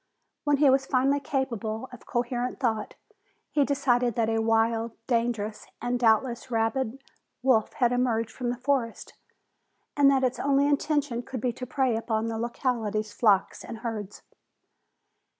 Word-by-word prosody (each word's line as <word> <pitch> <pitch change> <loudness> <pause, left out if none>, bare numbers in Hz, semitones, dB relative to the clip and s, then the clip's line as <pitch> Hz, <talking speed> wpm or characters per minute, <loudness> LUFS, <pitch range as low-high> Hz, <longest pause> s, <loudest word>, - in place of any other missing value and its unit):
When 290 -1 +3
he 290 0 +5
was 270 0 +3
finally 275 +2 +2
capable 250 -4 -3
of 250 - -13
coherent 245 +1 -2
thought, 225 -5 -1 0.6
he 295 -2 +3
decided 250 -4 +1
that 225 -1 +1
a 225 0 +1
wild, 225 0 +1
dangerous 230 -3 -1
and 245 0 -1
doubtless 235 +2 +2
rabid 225 +2 0 0.4
wolf 250 -5 +3
had 240 -1 +2
emerged 240 -3 0
from 245 -2 -3
the 245 - -2
forest 255 -3 -1 0.8
and 285 -1 +6
that 270 -1 +3
its 255 -1 0
only 280 0 +3
intention 290 -4 0
could 255 +1 -6
be 245 +1 -1
to 250 +2 -7
prey 260 -2 +1
upon 225 0 -1
the 225 -1 -3
locality's 225 -3 -2
flocks 205 -5 +2
and 230 -2 -8
herds. 210 -3 -5
240 Hz, 150 wpm, -27 LUFS, 225-265 Hz, 0.8 s, and